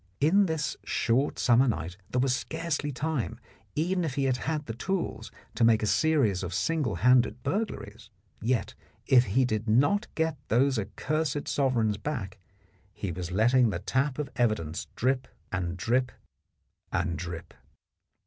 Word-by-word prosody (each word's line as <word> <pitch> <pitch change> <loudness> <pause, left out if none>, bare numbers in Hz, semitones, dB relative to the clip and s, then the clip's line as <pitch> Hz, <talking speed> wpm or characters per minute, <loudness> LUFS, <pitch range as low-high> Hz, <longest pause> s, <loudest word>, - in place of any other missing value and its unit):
In 190 +7 +4
this 160 -3 -1
short 125 +5 +1
summer 125 +2 +4
night 85 -5 -2
there 125 - 0
was 130 0 +2
scarcely 160 -1 -2
time, 130 -4 -2 0.4
even 180 +4 0
if 150 -5 -2
he 140 - 0
had 130 -2 +2
had 150 +4 -2
the 115 - -5
tools, 190 - -3 0.2
to - - 0
make 115 -1 +5
a - - +2
series 105 - +2
of 90 -1 -4
single 145 - 0
handed 125 +3 +3
burglaries, 115 - -3 0.3
yet 120 +2 0 0.3
if 125 -1 +5
he 125 +7 +2
did 110 -1 -2
not 145 - +3
get 160 -2 0
those 130 +1 +3
accursed 145 +7 -2
sovereigns 120 -7 +1
back, 105 -7 -4 0.5
he 100 -2 -4
was 90 +1 -5
letting 120 +5 +4
the 100 - -2
tap 130 - 0
of 150 -3 -3
evidence 95 -10 0
drip 130 +1 0 0.2
and 90 -2 -2
drip 125 +7 +1 0.8
and 85 -1 0
drip. 85 -2 -6
125 Hz, 150 wpm, -28 LUFS, 105-145 Hz, 0.8 s, make